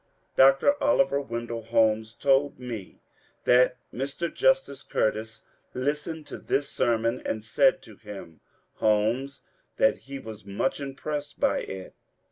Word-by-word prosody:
Dr. 135 - +5
Oliver 185 - +3
Wendell 115 -3 -4
Holmes 110 -1 +2
told 140 +1 +2
me 120 -6 -7 0.4
that 125 +1 +4 0.2
Mr. 140 +6 -3
Justice - - +2
Cur 110 - +1
tis 110 0 -9 0.3
listened 150 +4 -2
to - - -8
this 140 0 0
sermon 115 +1 +1
and 110 -1 -3
said 180 +10 +3
to 110 -3 -14
him 100 -6 -10 0.4
(Holmes) 110 +6 +1 0.4
that - - +3
he 140 - -4
was 110 -5 -9
much 100 +9 -1
impressed 145 +1 -5
by - - +2
it. 95 -1 -7
125 Hz, 130 wpm, -27 LUFS, 110-140 Hz, 0.4 s, Dr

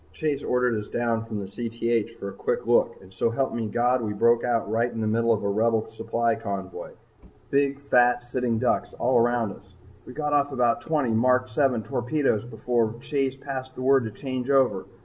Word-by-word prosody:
Chase 150 -3 -1
ordered 125 -2 +1
us 105 - -7
down 115 -1 -1
from 105 -3 -5
Cth 115 +1 -2
for 100 - -5
a - - -9
quick - - -2
look - - +2
and 95 0 -16
so 95 +5 +1
help 130 +4 -1
me, 115 -2 -2
God, 120 +3 +1
we 105 -2 -2
broke 115 +3 +3
out 120 -3 0
right 115 +3 0
in 115 - -6
the 110 - -1
middle 115 +2 +2
of 110 -3 +1
a - - 0
Rebel 110 +2 +1
supply 115 +1 0
convoy 95 -4 -6 0.6
big, 140 0 +2
fat, 125 -3 +3
sitting 120 -1 -1
ducks 125 +2 0
all 125 0 +2
around 120 -2 +1
us. 95 0 -15 0.3
We 125 - -9
got 150 0 -2
off 145 0 +2
about 120 -3 +1
twenty 145 -2 0
Mark 125 +3 +3
VII 125 -1 +1
torpedoes 120 +1 0
before 115 -1 -1
Chase 135 -1 -1
passed 130 -1 -6
the 130 - -5
word 135 -2 +4
to 110 - -4
change 130 -1 -4
over. 125 -9 +2
120 Hz, 200 wpm, -25 LUFS, 110-130 Hz, 0.6 s, word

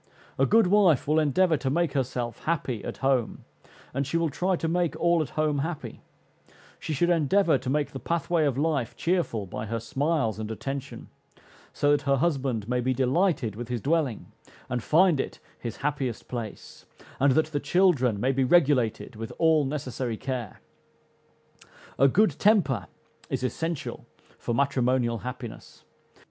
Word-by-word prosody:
A 135 - +4
good 225 0 +5
wife 180 -8 +4
will 155 +2 +3
endeavor 160 +3 +3
to 135 - -2
make 170 +1 0
herself 125 -3 -3
happy 140 -9 -1
at - - -6
home, 130 -4 0 0.5
and 140 +1 -1
she 165 - 0
will 165 -2 0
try 185 +7 0
to 165 - -2
make 175 0 0
all 170 -1 +3
at 155 - -3
home 155 -2 +1
happy: 160 +2 -5 0.8
she - - -5
should 170 +4 +2
endeavor 165 -1 +3
to 130 - -5
make 145 +1 0
the 135 - -6
pathway 170 0 0
of 135 -3 0
life 145 -5 0
cheerful 165 - -1
by 105 +3 -6
her 115 +2 -2
smiles 135 -1 -1
and 110 -1 -4
attention, 135 +5 -6 0.6
so 145 - +1
that 145 - +3
her 140 -1 +2
husband 135 -8 -1
may 125 0 0
be 130 +1 0
delighted 135 - +1
with 120 +1 -6
his 120 -1 -2
dwelling, 145 -4 -1 0.4
and 125 -1 -1
find 165 +2 +4
it - - -3 0.2
his 115 -2 -6
happiest 135 -6 -2
place; 115 -4 -7 0.3
and 135 0 +4
that 155 +3 +3
the 145 - -1
children 140 - +2
may 130 +5 +2
be 135 0 +1
regulated 130 -7 +2
with 115 +1 -6
all 160 -3 +3
necessary 130 -4 -3
care. 125 -5 -5 1.4
A 135 - +7
good 210 +11 +2
temper 200 - +3 0.4
is 130 -1 -2
essential 150 -1 -3 0.3
for 120 - -2
matrimonial 125 -3 +1
happiness. 125 -1 -8
140 Hz, 160 wpm, -26 LUFS, 125-165 Hz, 1.4 s, A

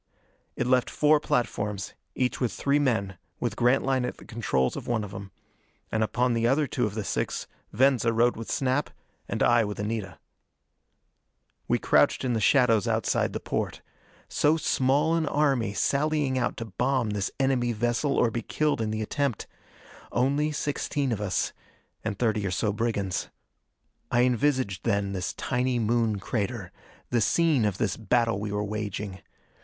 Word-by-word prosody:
It - - -1
left 125 0 +2
four 150 0 +4
platforms, 105 -8 -2 0.2
each 125 -1 0
with 125 - +1
three 140 +1 +1
men, 105 - 0 0.2
with - - -2
Grantline 130 +1 +2
at 125 - -3
the - - -14
controls 70 - 0
of - - -6
one 120 -3 0
of 100 - -7
them. 100 0 -7 0.6
And 110 - 0
upon 125 +3 +1
the 115 0 +2
other 145 +4 +3
two 125 -3 -1
of 105 - -7
the 110 - -2
six - - -2 0.3
Venza 125 0 +3
rode 120 +2 +3
with 115 - -7
Snap, 135 +2 0 0.4
and - - 0
I 120 -1 +5
with 105 -1 -4
Anita. 105 -4 -3 1.5
We - - +2
crouched - - +3
in 125 - +1
the 115 - +1
shadows 115 -4 +4
outside - - +1
the - - -3
porte. - - -3 0.4
So 150 +2 +2
small 145 +2 +2
an 165 -2 +1
army, 135 -9 +1
sallying 145 0 +1
out 125 -1 -1
to 115 - -4
bomb 125 +2 0
this 100 -2 -1
enemy 130 -3 +2
vessel 120 +5 0
or 120 - +3
be 115 - -2
killed 150 +2 0
in 110 - -1
the 110 0 -2
attempt! 140 0 -1 0.7
Only 140 +5 +1
sixteen 145 -2 -1
of 105 -3 -2
us. 95 -3 -1 0.5
And 100 - -3
thirty 110 -3 +1
or 95 - -1
so 100 +3 0
brigands. 105 -5 -1 0.8
I 120 +1 +3
envisaged 125 -5 +1
then 100 -3 0
this 90 -1 -3
tiny 125 0 0
Moon 115 -1 +1
crater, 105 0 -3 0.4
the 120 -2 +2
scene 155 -2 +3
of 100 -3 0
this 100 -3 -1
battle 115 -1 +1
we 105 0 -4
were 105 0 -1
waging. 105 -2 -4
120 Hz, 165 wpm, -27 LUFS, 105-130 Hz, 1.5 s, I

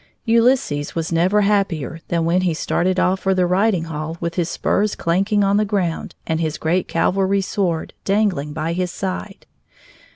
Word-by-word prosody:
Ulysses 230 - +2
was 165 0 -2
never 180 +5 +3
happier 195 -7 0
than 170 -1 0
when 175 +2 +2
he 175 -3 0
started 185 +3 0
off 185 +1 +2
for 190 0 +1
the 185 -1 +2
riding 185 0 +2
hall 160 0 -5
with 170 0 -3
his 170 -1 -1
spurs 210 +1 0
clanking 195 +5 +1
on 200 +1 +3
the 210 - +3
ground 195 -5 -2
and 160 0 -1
his 155 -2 -1
great 170 +3 0
cavalry 195 +3 +1
sword 180 -4 -2
dangling 195 -8 0
by 160 +2 -2
his 180 +1 -1
side. 190 +2 -5
185 Hz, 170 wpm, -20 LUFS, 165-200 Hz, -, never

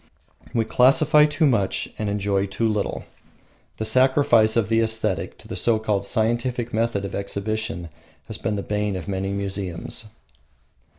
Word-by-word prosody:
We 115 -2 0
classify 150 +5 +5
too 155 +2 +1
much 110 -9 +1
and 105 -1 -1
enjoy 100 -1 0
too 115 +4 -1
little. 105 -2 -2 0.7
The 110 - -3
sacrifice 130 -3 +4
of 110 -3 +2
the 115 0 +2
aesthetic 110 -3 -1
to - - -15
the - - -6
so 115 -2 +3
called 105 -2 -1
scientific 120 +2 -1
method 110 -3 0
of 100 - -6
exhibition 100 -2 -3 0.4
has - - -8
been 105 - -2
the 100 - -3
bane 105 -1 -1
of 90 - -6
many 95 0 -2
museums. 100 0 -4
110 Hz, 155 wpm, -23 LUFS, 100-115 Hz, 0.7 s, classify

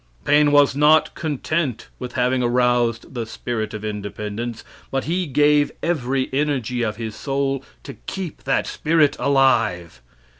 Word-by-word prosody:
Paine 150 0 +4
was 145 -2 +5
not 150 +2 +4
content 155 -3 -2
with 125 -1 -6
having 125 0 +1
aroused 120 -1 +1
the 115 -3 -4
spirit 110 -2 -4
of 105 0 -6
independence, 105 +2 -5 0.3
but 135 -1 -1
he 175 +3 -1
gave 145 +1 +3
every 135 -5 0
energy 135 -4 -1
of 110 -2 -1
his 110 -1 -6
soul 135 -1 -2 0.2
to - - -8
keep 185 -5 -5
that 135 - +1
spirit 155 -2 +2
alive. 115 - +2
130 Hz, 140 wpm, -21 LUFS, 115-145 Hz, 0.3 s, was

